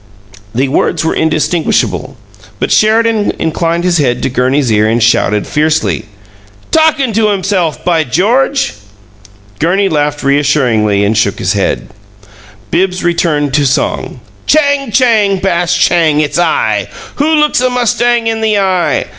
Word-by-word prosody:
The 135 Hz, +3 st, +1 dB
words 160 Hz, +4 st, -1 dB
were -, -, 0 dB
indistinguishable, 160 Hz, +1 st, -1 dB, 0.4 s
but -, -, -2 dB
Sheridan 220 Hz, 0 st, +2 dB
inclined 165 Hz, +1 st, -1 dB
his 175 Hz, -2 st, +1 dB
head 125 Hz, -4 st, 0 dB
to 130 Hz, -, -1 dB
Gurney's 130 Hz, 0 st, 0 dB
ear 105 Hz, 0 st, +2 dB
and 115 Hz, +1 st, +1 dB
shouted 105 Hz, -2 st, +1 dB
fiercely: 155 Hz, -6 st, -1 dB, 0.7 s
"Talkin' 310 Hz, -6 st, +2 dB
to 220 Hz, 0 st, +2 dB
himself! 190 Hz, -5 st, -1 dB
By 165 Hz, -3 st, +2 dB
George!" 230 Hz, -, 0 dB, 0.9 s
Gurney 190 Hz, +5 st, +1 dB
laughed 145 Hz, -2 st, -1 dB
reassuringly, 130 Hz, -8 st, +1 dB
and 105 Hz, +2 st, 0 dB
shook 105 Hz, -2 st, 0 dB
his 90 Hz, -, -1 dB
head. 100 Hz, -1 st, -2 dB, 0.8 s
Bibbs 185 Hz, +1 st, 0 dB
returned 155 Hz, -5 st, 0 dB
to 145 Hz, -1 st, +2 dB
song: 130 Hz, -, -2 dB, 0.3 s
Chang! 285 Hz, -4 st, +1 dB
Chang, 215 Hz, -5 st, +2 dB
bash, 175 Hz, -2 st, 0 dB
chang! 160 Hz, -4 st, +2 dB
It's 150 Hz, +1 st, -1 dB
I! 475 Hz, -, 0 dB, 0.3 s
WHO 310 Hz, +3 st, +1 dB
looks 300 Hz, -4 st, +2 dB
a 255 Hz, -, +1 dB
mustang 240 Hz, -1 st, 0 dB
in 225 Hz, 0 st, -1 dB
the 215 Hz, -1 st, +1 dB
eye? 190 Hz, -3 st, 0 dB
170 Hz, 140 wpm, -11 LUFS, 145-220 Hz, 0.9 s, Sheridan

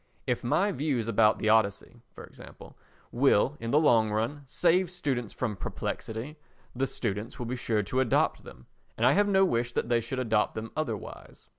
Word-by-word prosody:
If 125 Hz, -2 st, -1 dB
my 195 Hz, +12 st, +1 dB
views 140 Hz, -, -1 dB
about 110 Hz, -2 st, +3 dB
the 110 Hz, -, 0 dB
Odyssey, 110 Hz, +1 st, +1 dB
for -, -, -12 dB
example, -, -, -13 dB, 0.4 s
will, 135 Hz, +1 st, +3 dB
in 115 Hz, -, -5 dB
the 145 Hz, -, +4 dB
long 115 Hz, -8 st, +4 dB
run, 115 Hz, +7 st, -2 dB
save 175 Hz, +5 st, +2 dB
students 135 Hz, -, -3 dB
from 115 Hz, -5 st, -3 dB
perplexity, 110 Hz, -, -5 dB, 0.4 s
the 135 Hz, +2 st, 0 dB
students 105 Hz, -2 st, -4 dB
will 120 Hz, -, -5 dB
be 125 Hz, +2 st, -3 dB
sure 110 Hz, -4 st, -1 dB
to 115 Hz, +6 st, -2 dB
adopt 130 Hz, -3 st, +1 dB
them, 65 Hz, -, -13 dB, 0.3 s
and 115 Hz, -, +1 dB
I 125 Hz, -, +6 dB
have 205 Hz, +6 st, +3 dB
no 195 Hz, -1 st, +4 dB
wish 120 Hz, -6 st, -1 dB
that -, -, -2 dB
they 120 Hz, -1 st, +2 dB
should 115 Hz, +3 st, -5 dB
adopt 110 Hz, -4 st, 0 dB
them 110 Hz, +1 st, -6 dB
otherwise. 120 Hz, -10 st, -6 dB
120 Hz, 185 wpm, -28 LUFS, 110-140 Hz, 0.4 s, I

